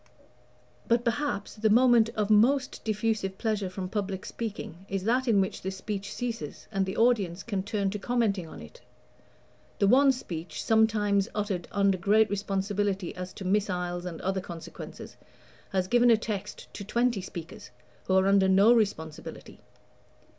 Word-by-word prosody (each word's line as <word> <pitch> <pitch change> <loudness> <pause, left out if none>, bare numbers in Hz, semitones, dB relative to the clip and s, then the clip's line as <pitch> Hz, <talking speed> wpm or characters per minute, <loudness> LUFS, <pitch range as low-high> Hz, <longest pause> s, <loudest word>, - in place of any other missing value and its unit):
But, 235 +1 +2
perhaps, 235 -4 -1
the 220 +1 +2
moment 235 0 +5
of 215 -1 0
most 255 +6 +3
diffusive 215 -3 -1
pleasure 210 -4 -1
from 185 0 -5
public 195 -1 -3
speaking 205 -6 -6
is 195 -1 -2
that 250 +5 +1
in 220 -4 +4
which 190 0 -1
the 190 - -3
speech 195 +1 -5
ceases 230 -11 -5
and 195 -2 0
the 190 - -4
audience 200 -7 +2
can 200 -5 -2
turn 200 -1 -1
to 210 - -4
commenting 210 -6 0
on - - -10
it. 75 - -14 1.0
The - - +2
one 270 +5 +6
speech, 175 -10 -6
sometimes 210 -3 +2
uttered 200 -4 -2
under 200 -2 +2
great 210 +4 +3
responsibility 200 -1 -1
as 180 0 -6
to 195 - -8
missiles 180 -3 -1
and 170 -3 -6
other 190 0 -1
consequences, 170 -2 -9 0.5
has 185 -1 0
given 240 +3 +4
a 230 - +6
text 210 -2 -6
to 200 - -6
twenty 235 0 0
speakers 170 -3 -9 0.4
who 190 - +1
are 190 0 +4
under 195 -1 +4
no 200 +5 +6
responsibility. 160 -9 -3
200 Hz, 155 wpm, -28 LUFS, 190-225 Hz, 1.0 s, one